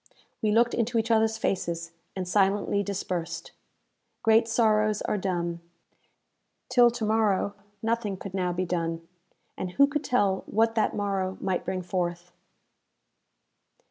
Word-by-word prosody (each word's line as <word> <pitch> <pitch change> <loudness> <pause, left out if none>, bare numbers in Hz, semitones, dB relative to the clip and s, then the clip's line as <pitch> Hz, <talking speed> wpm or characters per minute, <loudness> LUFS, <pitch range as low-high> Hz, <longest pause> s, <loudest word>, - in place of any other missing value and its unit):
We 215 - +1
looked 235 +3 +3
into 235 0 0
each 225 +1 +1
others 220 0 +3
faces, 170 -5 -2 0.2
and 185 -2 -3
silently 200 +1 +2
dispersed. 190 -4 -4 0.7
Great 225 0 +5
sorrows 215 -2 +2
are - - 0
dumb. 175 -3 -2 1.1
Till 245 -1 +6
to 235 -2 -3
morrow 210 -2 +2 0.3
nothing 225 -3 -1
could 190 0 -8
now 180 -2 0
be 180 +1 -1
done, 165 -1 -2 0.5
and 180 -1 -5
who 280 - +6
could 295 +1 -2
tell 200 -8 +1
what 225 +2 +2
that 225 - +1
morrow 195 -2 -1
might 185 -2 -1
bring 185 -1 -2
forth? 175 -1 -3
200 Hz, 135 wpm, -27 LUFS, 180-225 Hz, 1.1 s, Till